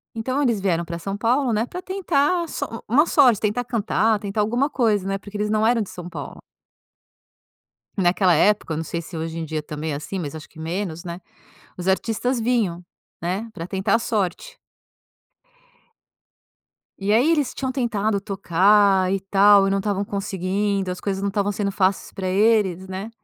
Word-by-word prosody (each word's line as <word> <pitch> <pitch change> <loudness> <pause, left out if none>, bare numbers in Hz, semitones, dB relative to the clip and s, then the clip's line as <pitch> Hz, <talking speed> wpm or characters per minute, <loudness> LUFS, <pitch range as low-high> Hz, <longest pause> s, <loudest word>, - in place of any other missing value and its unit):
Então, 255 +5 -1
eles 235 -7 +1
vieram 175 -3 0
para 170 0 -5
São 195 +3 -4
Paulo, 240 +4 +1
né, 220 +2 +1
para 360 +8 -7
tentar 360 -3 +1
a - - -6
sor 230 -6 -5
uma 280 +8 +4
sorte. 255 -10 +4
Tentar 215 +3 0
cantar, 225 -2 +1
tentar 200 +1 -2
alguma 240 +7 +1
coisa, 215 -8 +1
né, 195 0 -1
porque 205 +2 -9
eles 210 0 -1
não 215 0 +2
eram 230 0 +3
de 205 - -4
São 175 -1 -8
Paulo. - - -8 1.6
Naquela 185 -1 +3
época, 200 +2 +2
eu - - -2
não 160 - -3
sei 170 +2 -4
se 170 +1 -9
hoje 160 +1 -4
em 165 - -3
dia 155 -1 -3
também 150 +1 -5
é - - -2
assim, 155 +6 -5
mas 150 -5 -5
acho 155 -1 -9
que 160 - -19
menos, 170 +1 -4
né? 170 0 -6 0.6
Os 180 +1 -5
artistas 225 +6 0
vinham, 220 -7 0 0.4
né, 190 +7 -3
para 165 -3 -6
tentar 195 +2 +1
a 230 - +2
sorte. 220 - -2 2.4
E 200 +1 0
aí 250 +8 +4
eles 295 -5 +1
tinham 260 -1 -2
tentado 220 -5 0
tocar 195 0 +3
e 195 - 0
tal, 200 +1 +5
e - - 0
não 195 - +1
estavam 200 0 -1
conseguindo. 195 0 -2
As 180 - -4
coisas 195 -1 -3
não 200 - 0
estavam 205 0 0
sendo 200 0 -1
fáceis 190 -1 0
para 190 - -5
eles, 190 -2 +2
né? 190 +4 -5
200 Hz, 185 wpm, -22 LUFS, 185-225 Hz, 2.4 s, tal